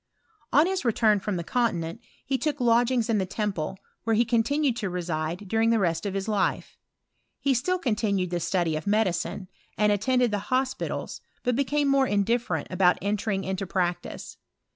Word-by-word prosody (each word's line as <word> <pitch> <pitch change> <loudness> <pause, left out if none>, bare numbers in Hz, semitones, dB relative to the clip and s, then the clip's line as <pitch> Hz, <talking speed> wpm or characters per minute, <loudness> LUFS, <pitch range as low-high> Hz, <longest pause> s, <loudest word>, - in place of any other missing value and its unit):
On 295 +3 +5
his 380 +1 -1
return 220 -3 +3
from 205 0 -3
the 170 - -3
continent, 200 -3 -1 0.2
he 270 - 0
took 300 -2 -1
lodg 240 0 +4
ings 245 -3 +1
in 220 -3 +2
the 190 - 0
Temple, 190 -4 -3 0.3
where 225 -1 +1
he 235 +2 +3
continued 245 +4 +1
to 205 -5 -2
reside 175 +1 -3
during 225 +3 +2
the 230 - +4
rest 170 -1 0
of 195 - -4
his 195 +1 -2
life. 205 -3 -1 0.6
He 275 - +2
still 330 +10 +1
continued 210 - 0
the 175 - 0
study 170 -1 0
of 155 +5 -5
medicine, 200 -2 0 0.3
and 210 0 +3
attended 245 +3 +2
the 205 - 0
hospitals, 260 +1 -2 0.2
but 250 -1 +1
became 285 +2 +1
more 275 -1 +3
indifferent 205 -5 0
about 180 -1 +4
entering 200 -1 -1
into 190 0 -3
prac 175 -2 0
tice. - - -9
210 Hz, 180 wpm, -26 LUFS, 185-245 Hz, 0.6 s, On